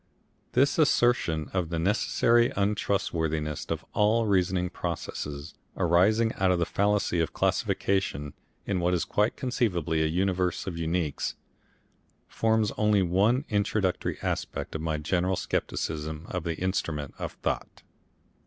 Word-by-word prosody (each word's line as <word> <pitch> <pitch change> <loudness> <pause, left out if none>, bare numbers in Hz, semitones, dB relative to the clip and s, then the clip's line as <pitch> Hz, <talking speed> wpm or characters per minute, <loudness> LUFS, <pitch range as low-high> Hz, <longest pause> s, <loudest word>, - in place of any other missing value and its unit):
This 140 +5 +3
assertion 120 - +2
of 90 -4 -1
the 85 - -2
necessary 115 +6 +3
untrustworthiness 80 -7 -1
of - - -3
all 110 +2 +3
reasoning 90 -3 +1
processes 75 -3 -5 0.2
arising 105 +7 +3
out 95 -1 +2
of 90 - +3
the 85 - +1
fallacy 100 -3 +1
of 80 - 0
classification 75 -7 0 0.3
in 95 -2 0
what 90 +1 +2
is 85 - -1
quite 105 +2 +1
conceivably 90 - 0
a 80 - +2
universe 90 +1 0
of 95 - -3
uniques, 85 -2 -2 0.9
forms 110 -2 +1
only 105 -2 +4
one 105 - +2
introductory 100 -2 0
aspect - - -3
of 80 - -3
my 80 -1 -1
general 90 +5 0
scepticism 80 -2 -3
of 90 -3 -3
the 85 -1 -1
Instrument 80 -6 -2
of - - -4
Thought. - - -4
90 Hz, 130 wpm, -27 LUFS, 80-105 Hz, 0.9 s, only